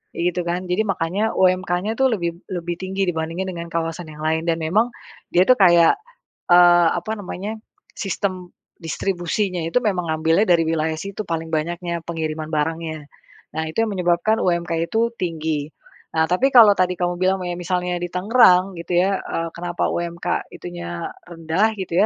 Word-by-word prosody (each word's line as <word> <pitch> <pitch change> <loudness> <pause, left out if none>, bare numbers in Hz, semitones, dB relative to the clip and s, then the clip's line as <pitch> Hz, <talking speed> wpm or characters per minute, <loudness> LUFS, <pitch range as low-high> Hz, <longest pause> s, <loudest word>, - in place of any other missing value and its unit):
kayak 170 - -2
gitu 180 - -1
kan. 175 +2 -1
Jadi 180 +3 0
makanya 195 +4 -1
UMK-nya 185 +2 +1
itu 265 - +4
lebih 180 -9 -1 0.2
lebih 175 -1 -3
tinggi 190 +1 -2
dibandingkan 170 +2 -2
dengan 170 -1 -6
kawasan 165 0 -3
yang 155 0 -10
lain. 160 +1 0
Dan 165 - +1
memang 210 +9 +2 0.4
dia 180 - +4
itu 255 - +7
kayak, 170 -3 +6 0.6
eee, 175 -1 +7
apa 195 +5 -4
namanya 205 +3 -6 0.3
sistem 185 -1 -3 0.3
distribusinya 180 +2 -2
itu 165 - 0
memang 185 -5 0
ngambilnya 160 +6 +2
dari 170 -2 +4
wilayah 160 0 0
situ 195 +5 -5
paling 165 -1 -3
banyaknya 170 +2 -2
pengiriman 160 -2 -3
barangnya. 155 0 -2 0.5
Nah - - 0
itu 225 +8 0
yang 220 - -2
menyebabkan 180 +4 +1
UMK 170 -2 0
itu 230 +1 +1
tinggi. 160 -4 -2 0.5
Nah 160 0 +3
tapi 215 +10 +3
kalau 225 -5 +9
tadi 180 0 +2
kamu 175 0 0
bilang 190 +1 +3
me 175 -1 -3
misalnya 180 0 -1
di 175 - -2
Tangerang 190 -1 +4
gitu 175 +1 -1
ya, 195 +1 +2
eee, 165 0 -3
kenapa 175 0 -2
UMK 170 0 -3
itu - - -8
nya 85 0 -5 0.2
rendah 170 +5 0
gitu 185 -1 0
175 Hz, 165 wpm, -21 LUFS, 165-190 Hz, 0.6 s, kalau